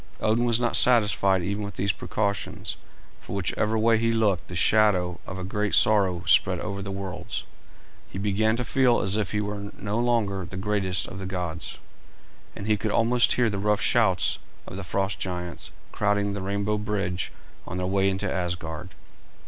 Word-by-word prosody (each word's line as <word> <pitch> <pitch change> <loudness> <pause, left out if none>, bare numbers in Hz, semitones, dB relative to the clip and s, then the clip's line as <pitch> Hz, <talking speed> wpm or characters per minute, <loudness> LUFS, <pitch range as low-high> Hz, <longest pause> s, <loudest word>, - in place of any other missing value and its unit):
Odin 115 +3 +2
was 120 -1 +3
not 120 -1 0
satisfied 105 -6 +4
even 100 +3 -2
with 100 - -6
these 100 +1 +1
precautions, 100 +1 -3 0.4
for - - -9
whichever 105 +4 0
way 110 0 +3
he 115 0 +2
looked 105 -6 +1
the 90 - -7
shadow 90 -1 +3
of 95 - -6
a 95 - -5
great 105 +2 -1
sorrow 95 -5 +3
spread - - +4
over 100 0 -4
the 100 - -6
worlds. 95 -1 -5 0.7
He - - -7
began 105 +2 +1
to 125 +1 -2
feel 125 -1 +3
as 100 0 +1
if 105 -3 -1
he 105 - 0
were 100 -1 -4
no 105 +3 -2
longer 110 -6 +1
the 95 +2 -8
greatest 95 -2 0
of 95 - -8
the 95 - -5
gods, 90 -3 -4 0.8
and 100 - -6
he 105 0 +2
could 110 +2 -2
almost 120 +3 +3
hear 120 -1 +2
the 100 -3 -2
rough 105 +1 +1
shouts 95 -8 +2 0.3
of - - -9
the 100 - -5
frost 95 +1 -1
giants 90 -2 -4 0.2
crowding 105 -1 0
the 100 - -4
rainbow 100 +2 -1
bridge 100 -4 -2 0.4
on 90 - -4
their 90 - -1
way 95 +1 +2
into 95 0 -2
Asgard. 85 -3 -4
100 Hz, 180 wpm, -26 LUFS, 95-110 Hz, 0.8 s, satisfied